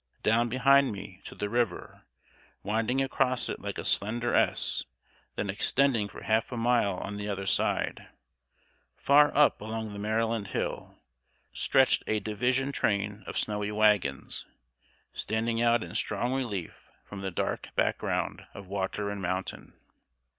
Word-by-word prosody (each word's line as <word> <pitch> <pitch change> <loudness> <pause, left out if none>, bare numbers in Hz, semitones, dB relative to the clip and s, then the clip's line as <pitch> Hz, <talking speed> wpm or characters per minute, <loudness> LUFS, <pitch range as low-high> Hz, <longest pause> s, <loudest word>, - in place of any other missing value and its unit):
Down 115 +2 +3
behind 135 +3 +4
me, 95 -2 -9
to - - -9
the 105 - -2
river, 120 +1 -2 0.6
winding 115 +5 +1
across 130 -2 0
it - - -4
like - - -5
a - - -5
slender 115 +4 0
S, - - +2 0.5
then 105 - -2
extending 115 +2 +2
for - - -11
half 110 +3 +1
a 120 - -4
mile 115 -4 +2
on 100 +2 -5
the 105 0 -4
other 100 -1 -3
side, 95 - 0 0.9
far 145 +1 +5
up 150 - +5
along 110 0 -4
the 100 - -7
Maryland 110 0 0
hill, - - -4 0.6
stretched - - +3
a 110 - +1
division 125 +6 0
train 105 -4 -1
of - - -4
snowy 105 -1 -1
wagons, 105 -10 +1 0.7
standing 115 +1 -1
out 120 -1 +3
in - - -9
strong 120 +5 -1
relief 105 -10 -4 0.2
from 100 -1 -8
the 95 - -2
dark 85 - -3
background - - -1
of 100 - -8
water 100 +2 -2
and 100 -1 -5
mountain. 95 +1 -4
110 Hz, 145 wpm, -29 LUFS, 100-120 Hz, 0.9 s, far